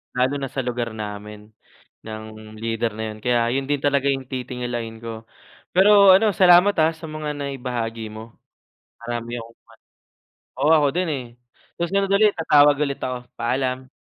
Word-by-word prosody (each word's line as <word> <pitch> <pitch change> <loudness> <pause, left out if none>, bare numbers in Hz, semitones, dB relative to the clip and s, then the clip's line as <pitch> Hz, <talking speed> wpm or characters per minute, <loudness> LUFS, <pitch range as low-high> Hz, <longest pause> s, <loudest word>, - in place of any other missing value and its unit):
lalo 130 +2 +1
na 135 - -3
sa 135 0 -4
lugar 120 -2 -3
namin 105 0 -8 0.5
ng 110 0 -9
leader 115 -1 -2
na 110 -1 -4
yun, - - -13
kaya 120 -1 +2
yun 135 +1 -2
din 145 - +2
talaga 140 0 +1
yung 135 -1 -3
titingalain 120 -3 -5
ko. 115 -1 -8 0.5
Pero 200 +1 +6
ano, 195 +1 +5
salamat, 180 +2 +6
ah, 160 - +4
sa 160 0 -10
mga 155 -1 -5
naibahagi 120 -5 -4
mo. 110 +1 -11 0.7
Marami 120 0 -5
akong 115 0 -13
mat - - -110 0.9
oo, 155 - +3
ako 145 -2 +3
din 185 - 0
eh, 130 - -5 0.6
susunod 195 +3 0
ulit, 210 +1 +5
tatawag 145 -3 +5
ulit 140 -1 -3
ako, 125 -1 -4 0.2
paalam. 130 +2 -2
125 Hz, 160 wpm, -22 LUFS, 115-150 Hz, 0.9 s, Pero